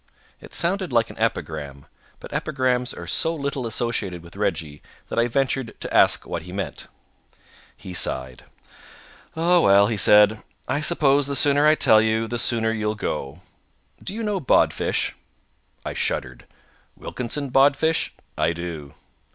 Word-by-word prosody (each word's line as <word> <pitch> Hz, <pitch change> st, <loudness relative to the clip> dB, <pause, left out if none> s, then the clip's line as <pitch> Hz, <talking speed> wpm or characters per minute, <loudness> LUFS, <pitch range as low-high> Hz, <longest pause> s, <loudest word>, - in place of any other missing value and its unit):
It -, -, -12 dB
sounded 185 Hz, 0 st, -1 dB
like 115 Hz, -2 st, +1 dB
an -, -, -14 dB
epigram, 70 Hz, -3 st, -3 dB, 0.3 s
but -, -, -11 dB
epigrams 130 Hz, -3 st, -1 dB
are -, -, -9 dB
so 165 Hz, +1 st, +1 dB
little 140 Hz, -4 st, -3 dB
associated 105 Hz, -7 st, -2 dB
with 85 Hz, +2 st, -14 dB
Reggie 80 Hz, -7 st, -3 dB, 0.3 s
that -, -, -1 dB
I 120 Hz, -, +3 dB
ventured 130 Hz, -1 st, -2 dB
to -, -, -6 dB
ask -, -, +4 dB
what 85 Hz, -, -4 dB
he 90 Hz, +2 st, -11 dB
meant. 100 Hz, +1 st, -5 dB, 0.9 s
He 90 Hz, -, -9 dB
sighed. 65 Hz, -7 st, -1 dB, 0.9 s
"Ah 175 Hz, +2 st, +3 dB
well," 100 Hz, -8 st, +5 dB
he 110 Hz, +1 st, -2 dB
said. 105 Hz, +2 st, +5 dB, 0.3 s
"I 140 Hz, +3 st, -1 dB
suppose 145 Hz, -4 st, +3 dB
the 140 Hz, -, -2 dB
sooner 145 Hz, +1 st, +4 dB
I 155 Hz, -, +5 dB
tell 110 Hz, -7 st, +5 dB
you, 110 Hz, 0 st, 0 dB
the 120 Hz, +1 st, -3 dB
sooner 115 Hz, -2 st, +2 dB
you'll 110 Hz, -1 st, -2 dB
go. 75 Hz, -6 st, -5 dB, 0.6 s
Do 200 Hz, -, -3 dB
you 230 Hz, -, -4 dB
know 210 Hz, -2 st, -1 dB
Bodfish?" 135 Hz, -, +1 dB, 0.7 s
I -, -, -4 dB
shuddered. 60 Hz, -2 st, -3 dB, 0.5 s
"Wilkinson 135 Hz, +3 st, -5 dB
Bodfish? 145 Hz, +4 st, +2 dB, 0.2 s
I 85 Hz, -, 0 dB
do." 80 Hz, -5 st, -7 dB
115 Hz, 150 wpm, -23 LUFS, 90-140 Hz, 0.9 s, well